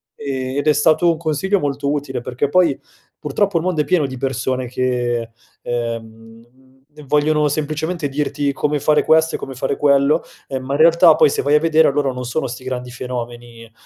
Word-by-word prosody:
ehm, 135 Hz, -2 st, -4 dB
ed 145 Hz, -, -1 dB
è 150 Hz, -, +5 dB
stato 160 Hz, +4 st, +3 dB
un 160 Hz, -, -2 dB
consiglio 170 Hz, +5 st, 0 dB
molto 140 Hz, -2 st, -2 dB
utile 140 Hz, -4 st, -3 dB
perché 125 Hz, +3 st, -2 dB
poi, 170 Hz, -4 st, +2 dB, 0.4 s
purtroppo, 180 Hz, +6 st, 0 dB
il 165 Hz, -, -1 dB
mondo 175 Hz, -5 st, +1 dB
è -, -, -2 dB
pieno 160 Hz, -1 st, +2 dB
di 130 Hz, -1 st, -7 dB
persone 130 Hz, -1 st, -2 dB
che, 120 Hz, -2 st, -2 dB, 0.3 s
ehm, 115 Hz, -1 st, -3 dB
mhmm, 130 Hz, +6 st, -18 dB
vogliono 150 Hz, +1 st, +2 dB
semplicemente 155 Hz, +2 st, -2 dB
dirti 140 Hz, 0 st, -2 dB
come 150 Hz, +2 st, -1 dB
fare 150 Hz, +2 st, +2 dB
questo 160 Hz, 0 st, +3 dB
e -, -, -5 dB
come 135 Hz, -, -7 dB
fare 135 Hz, -, -2 dB
quello, 140 Hz, 0 st, +3 dB, 0.2 s
ehm, 130 Hz, -1 st, -4 dB
ma, 135 Hz, +2 st, -4 dB
in -, -, -3 dB
realtà, 170 Hz, +1 st, +6 dB
poi -, -, +5 dB
se -, -, -1 dB
vai 145 Hz, +1 st, +3 dB
a -, -, +5 dB
vedere 160 Hz, -1 st, +3 dB
loro 140 Hz, -2 st, 0 dB
non 125 Hz, 0 st, -6 dB
sono 135 Hz, +3 st, -2 dB
'sti 125 Hz, +1 st, -8 dB
grandi 125 Hz, -1 st, -5 dB
fenomeni, 120 Hz, -1 st, -7 dB
ehm, 115 Hz, -, -16 dB
140 Hz, 200 wpm, -19 LUFS, 125-150 Hz, 0.4 s, realtà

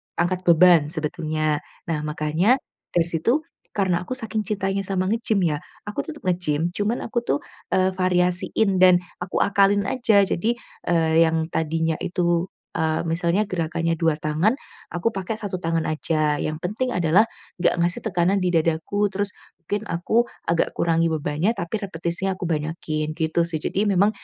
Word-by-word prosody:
angkat 180 Hz, +1 st, 0 dB
beban 170 Hz, -2 st, +6 dB
sebetulnya. 155 Hz, -1 st, -1 dB, 0.3 s
Nah 155 Hz, -2 st, -1 dB
makanya, 155 Hz, +9 st, +2 dB, 0.4 s
dari 175 Hz, -, +5 dB
situ, 170 Hz, -, 0 dB, 0.3 s
karena 185 Hz, -3 st, +2 dB
aku 255 Hz, +8 st, -4 dB
saking 220 Hz, -2 st, -2 dB
cintanya 200 Hz, -2 st, -1 dB
sama 190 Hz, -1 st, -1 dB
ngegim 215 Hz, -2 st, +1 dB
ya, 150 Hz, -, -4 dB, 0.2 s
aku 210 Hz, 0 st, -3 dB
tetep 310 Hz, -7 st, -9 dB
ngegim, 175 Hz, -2 st, 0 dB
cuman 210 Hz, +5 st, 0 dB
aku 240 Hz, +1 st, -1 dB
tuh, 140 Hz, -, 0 dB, 0.3 s
eee, 185 Hz, 0 st, +2 dB
variasiin 185 Hz, +2 st, +1 dB
dan 185 Hz, -1 st, +8 dB, 0.2 s
aku 180 Hz, +1 st, -3 dB
akalin 200 Hz, 0 st, +3 dB
aja 220 Hz, -6 st, +3 dB
jadi, 205 Hz, +4 st, 0 dB, 0.4 s
eee, 165 Hz, -2 st, +2 dB
yang 160 Hz, -1 st, +2 dB
tadinya 160 Hz, 0 st, 0 dB
itu, 175 Hz, -1 st, 0 dB, 0.2 s
eee, 160 Hz, 0 st, 0 dB
misalnya 170 Hz, +5 st, +1 dB
gerakannya 165 Hz, -2 st, -1 dB
2 165 Hz, -2 st, +1 dB
tangan, 155 Hz, -, +1 dB, 0.3 s
aku 180 Hz, +6 st, -1 dB
pakai 195 Hz, +3 st, -3 dB
1 195 Hz, -4 st, -4 dB
tangan 165 Hz, -1 st, 0 dB
aja, 155 Hz, -1 st, 0 dB
yang 155 Hz, 0 st, -2 dB
penting 215 Hz, +10 st, -2 dB
adalah, 180 Hz, +2 st, +3 dB, 0.3 s
enggak -, -, +3 dB
ngasih 175 Hz, +1 st, 0 dB
tekanan 190 Hz, -1 st, +1 dB
di 180 Hz, -, +1 dB
dadaku 170 Hz, +5 st, +1 dB
terus, 200 Hz, +1 st, -1 dB, 0.3 s
mungkin 205 Hz, +5 st, -3 dB
aku, 205 Hz, +7 st, +1 dB, 0.2 s
agak 170 Hz, 0 st, +1 dB
kurangi 165 Hz, -1 st, +1 dB
bebannya 155 Hz, +7 st, 0 dB
tapi 175 Hz, -1 st, -3 dB
repetisinya 175 Hz, +1 st, -2 dB
aku 185 Hz, -2 st, -5 dB
banyakin 155 Hz, -1 st, -2 dB
gitu 160 Hz, +1 st, 0 dB
sih, 160 Hz, -2 st, -4 dB
jadi 200 Hz, +3 st, 0 dB
memang, 200 Hz, 0 st, +4 dB
175 Hz, 155 wpm, -23 LUFS, 160-200 Hz, 0.4 s, dan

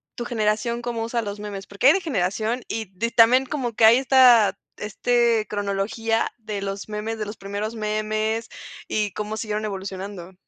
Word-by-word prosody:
¿tu 240 Hz, -, -5 dB
generación 230 Hz, +1 st, -1 dB
cómo 235 Hz, -1 st, -3 dB
usa 230 Hz, +1 st, -1 dB
los 205 Hz, -1 st, -6 dB
memes? 200 Hz, -2 st, -7 dB
Porque 200 Hz, +6 st, +1 dB
hay 285 Hz, -, +8 dB
de 390 Hz, -, 0 dB
generación 225 Hz, -, -1 dB
y 225 Hz, -1 st, -3 dB
di 230 Hz, +4 st, -1 dB
también 245 Hz, +4 st, +5 dB
como 255 Hz, -4 st, -3 dB
que 225 Hz, -, +5 dB
hay 225 Hz, +2 st, +8 dB
esta 250 Hz, -6 st, +5 dB, 0.2 s
este 230 Hz, +1 st, +1 dB
cronología 205 Hz, +3 st, -1 dB
de 210 Hz, -3 st, -5 dB
los 195 Hz, +1 st, -5 dB
memes, 215 Hz, +1 st, -4 dB
de 215 Hz, -, -2 dB
los 210 Hz, -, -7 dB
primeros 205 Hz, +3 st, -5 dB
memes 215 Hz, +1 st, -2 dB, 0.4 s
y 210 Hz, -2 st, -1 dB
cómo 215 Hz, +1 st, -4 dB
siguieron 215 Hz, -1 st, -3 dB
evolucionando. 195 Hz, -2 st, -6 dB
215 Hz, 170 wpm, -23 LUFS, 205-235 Hz, 0.4 s, hay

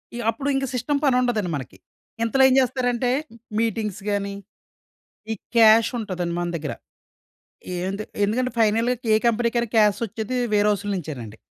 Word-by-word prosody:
ఈ -, -, -5 dB
అప్పుడు 280 Hz, +4 st, -2 dB
ఇంక 270 Hz, 0 st, 0 dB
సిస్టమ్ 280 Hz, +4 st, 0 dB
పనుండదండి 245 Hz, -8 st, +1 dB
మనకి. 130 Hz, -9 st, -7 dB, 0.5 s
ఇంతలో 250 Hz, +4 st, +3 dB
ఏం -, -, +3 dB
చేస్తారంటే 250 Hz, -1 st, 0 dB, 0.5 s
మీటింగ్స్ 215 Hz, -3 st, -1 dB
గానీ, 200 Hz, -1 st, -1 dB, 1.0 s
ఈ -, -, +1 dB, 0.2 s
క్యాష్ 225 Hz, 0 st, +6 dB
ఉంటదండి 180 Hz, -5 st, -3 dB
మన 175 Hz, -, -1 dB
దగ్గర. 150 Hz, -3 st, -4 dB, 1.0 s
ఏంతి 190 Hz, +4 st, -3 dB, 0.2 s
ఎందుకంటే 250 Hz, +5 st, 0 dB
ఫైనల్‌గా 225 Hz, +3 st, +3 dB
కే 220 Hz, -1 st, +4 dB
కంపెనీకైనా 235 Hz, 0 st, +1 dB
క్యాసొచ్చేది 220 Hz, +2 st, +1 dB, 0.2 s
వే‌ర్ 210 Hz, 0 st, +4 dB
హౌస్‌లు 205 Hz, 0 st, -1 dB
నుంచే‌నండి. 130 Hz, -, -6 dB
220 Hz, 130 wpm, -23 LUFS, 195-240 Hz, 1.0 s, క్యాష్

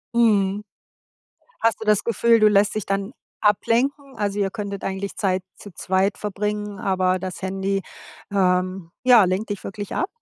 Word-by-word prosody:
Mhm. 205 Hz, -3 st, +3 dB, 1.0 s
Hast 230 Hz, 0 st, +2 dB
du 220 Hz, -, -5 dB
das 210 Hz, -1 st, +3 dB
Gefühl, 230 Hz, 0 st, +3 dB
du 215 Hz, -, +7 dB
lässt 205 Hz, 0 st, +3 dB
dich 215 Hz, -3 st, -2 dB
dann 195 Hz, +4 st, -2 dB, 0.3 s
ablenken, 245 Hz, +6 st, +1 dB
also 205 Hz, -1 st, -1 dB
ihr 195 Hz, -, +1 dB
könntet 200 Hz, -2 st, -5 dB
eigentlich 195 Hz, 0 st, -3 dB
Zeit 185 Hz, -2 st, 0 dB
zu 205 Hz, -, -12 dB
zweit 190 Hz, +3 st, 0 dB
verbringen, 210 Hz, 0 st, -3 dB
aber 185 Hz, -1 st, +1 dB
das 185 Hz, 0 st, -6 dB
Handy, 195 Hz, +1 st, -1 dB, 0.5 s
ähm, 185 Hz, -2 st, +1 dB
ja, 245 Hz, -3 st, +7 dB
lenkt 185 Hz, +4 st, -1 dB
dich 205 Hz, -, -4 dB
wirklich 205 Hz, 0 st, -6 dB
ab? 370 Hz, -, 0 dB
200 Hz, 160 wpm, -23 LUFS, 190-215 Hz, 1.0 s, du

